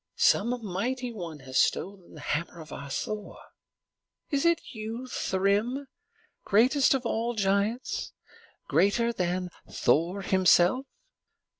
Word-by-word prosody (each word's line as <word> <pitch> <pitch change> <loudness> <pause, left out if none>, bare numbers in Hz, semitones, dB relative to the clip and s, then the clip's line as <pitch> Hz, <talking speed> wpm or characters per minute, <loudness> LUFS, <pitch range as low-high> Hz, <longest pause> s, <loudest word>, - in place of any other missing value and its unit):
Some 245 - +2
mighty 240 +6 -2
one 165 -8 -7
has 130 0 -1
stolen 190 -3 -1
the 150 - -10
hammer 165 +4 -3
of 155 -2 -10
our 140 - -7
Thor. 210 +8 -4 0.9
Is 280 +2 +1
it 335 -1 +4
you, 225 +3 -5
Thrym, 215 +4 0 0.6
greatest 260 +7 +4
of 260 -2 -3
all 235 +1 -1
giants, 205 +4 0 0.6
greater 235 +4 +2
than 180 -2 -1 0.2
Thor 180 +5 +1
himself?" 190 +7 +4
205 Hz, 115 wpm, -28 LUFS, 180-245 Hz, 0.9 s, it